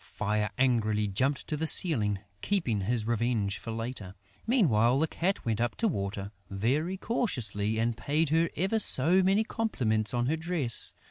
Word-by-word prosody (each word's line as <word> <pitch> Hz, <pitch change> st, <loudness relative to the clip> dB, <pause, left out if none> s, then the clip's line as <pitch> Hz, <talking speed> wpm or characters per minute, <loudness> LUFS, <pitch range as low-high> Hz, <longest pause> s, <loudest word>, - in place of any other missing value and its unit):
Fire 105 Hz, 0 st, 0 dB
angrily 110 Hz, -5 st, +1 dB
jumped 130 Hz, +8 st, -1 dB
to 155 Hz, -, -3 dB
the 160 Hz, +2 st, -1 dB
ceiling, 110 Hz, -, +4 dB, 0.2 s
keeping 130 Hz, -, 0 dB
his 110 Hz, +2 st, 0 dB
revenge 115 Hz, -3 st, -1 dB
for -, -, -9 dB
later. 115 Hz, -4 st, -5 dB, 0.3 s
Meanwhile, 130 Hz, -, +3 dB
the 160 Hz, -, +3 dB
Cat 180 Hz, +4 st, -2 dB
went 115 Hz, -1 st, -1 dB
up 120 Hz, -, -1 dB
to 230 Hz, -, 0 dB
Water, 100 Hz, -, -3 dB, 0.2 s
very 140 Hz, -, -1 dB
cautiously, 110 Hz, -, -1 dB
and 115 Hz, +1 st, 0 dB
paid 145 Hz, +7 st, 0 dB
her 165 Hz, +2 st, +2 dB
ever 195 Hz, +5 st, 0 dB
so 175 Hz, 0 st, +3 dB
many 195 Hz, +4 st, +3 dB
compliments 120 Hz, -, 0 dB
on 120 Hz, -1 st, 0 dB
her 155 Hz, +5 st, 0 dB
dress. 160 Hz, -7 st, -2 dB
120 Hz, 160 wpm, -29 LUFS, 110-165 Hz, 0.3 s, ceiling